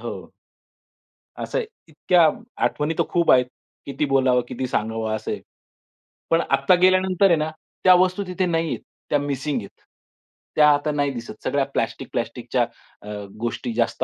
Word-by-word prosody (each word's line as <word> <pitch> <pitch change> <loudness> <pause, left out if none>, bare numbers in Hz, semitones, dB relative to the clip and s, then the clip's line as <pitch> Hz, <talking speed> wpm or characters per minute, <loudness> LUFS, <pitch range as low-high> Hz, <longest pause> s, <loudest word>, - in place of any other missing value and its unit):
हो. - - -7 1.1
असं - - -3
आहे, - - -1 0.2
इतक्या 165 +1 +3 0.4
आठवणी 150 +2 -1
तर - - +5
खूप 170 -1 +3
आहेत. 125 -1 +5 0.4
किती 140 +2 -2
बोलावं, 130 -2 +4
किती 130 +1 -4
सांगावं 110 -1 -1
असं 110 - -5
आहे. - - -4 0.9
पण 165 0 +3
आत्ता 140 +6 +4
गेल्यानंतर 185 +1 +4
आहे 175 - +5
ना, 155 0 -1 0.3
त्या 185 - +8
वस्तू 185 +2 +2
तिथे 185 0 -1
नाही 165 -1 0
आहे. - - -2 0.3
त्या 145 - +2
मिसिंग 140 -1 -2
आहेत. 100 - -14 0.7
त्या 150 -1 +6
आता 145 +1 0
नाही 145 -1 0
दिसत. 120 -3 -7
सगळ्या 140 -1 +1
प्लास्टिक-प्लास्टिकच्या 120 +1 -2 0.4
अ, - - -13 0.3
गोष्टी 120 +1 -3
जास्त 115 0 0
145 Hz, 155 wpm, -23 LUFS, 120-165 Hz, 1.1 s, त्या